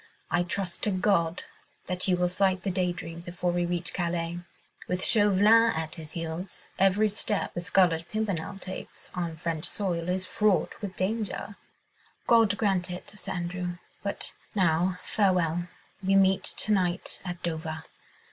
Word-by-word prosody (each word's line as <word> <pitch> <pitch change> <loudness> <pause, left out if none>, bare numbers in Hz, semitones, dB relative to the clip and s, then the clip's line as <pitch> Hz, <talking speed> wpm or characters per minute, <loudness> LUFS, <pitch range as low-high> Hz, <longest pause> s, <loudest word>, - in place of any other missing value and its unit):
"I 175 - +3
trust 180 0 -2
to - - +1
God 185 -3 +1 0.4
that 180 +1 -1
you 180 -1 +3
will 180 0 +2
sight 185 +1 +1
the 195 - 0
Day 180 -1 +1
Dream 170 -1 -7
before 175 +1 -2
we 175 0 0
reach 175 0 -1
Calais. 170 -1 -1 0.5
With 180 +1 0
Chauvelin 210 +2 +6
at 160 0 -3
his 160 -2 -9
heels, 165 +2 -5
every 195 +3 +4
step 210 0 -1
the - - -3
Scarlet 175 -2 +2
Pimpernel 200 -3 -2
takes 190 -1 -8
on 170 -2 -3
French 160 -2 -2
soil 180 -4 -1
is 185 +1 0
fraught 200 -3 +1
with 195 -3 -5
danger." 205 +1 -2 0.7
"God 225 -4 +5
grant 195 -4 +1
it, 180 0 -6
Sir 210 - -7
Andrew. 175 0 -3 0.2
But 200 - -3 0.2
now, 180 -1 +2
farewell. 175 -4 +1 0.3
We 195 0 +2
meet 190 -1 +4
to 215 - -1
night 185 -3 0
at 175 -2 -6
Dover! 160 -1 -3
180 Hz, 155 wpm, -28 LUFS, 175-195 Hz, 0.7 s, Chauvelin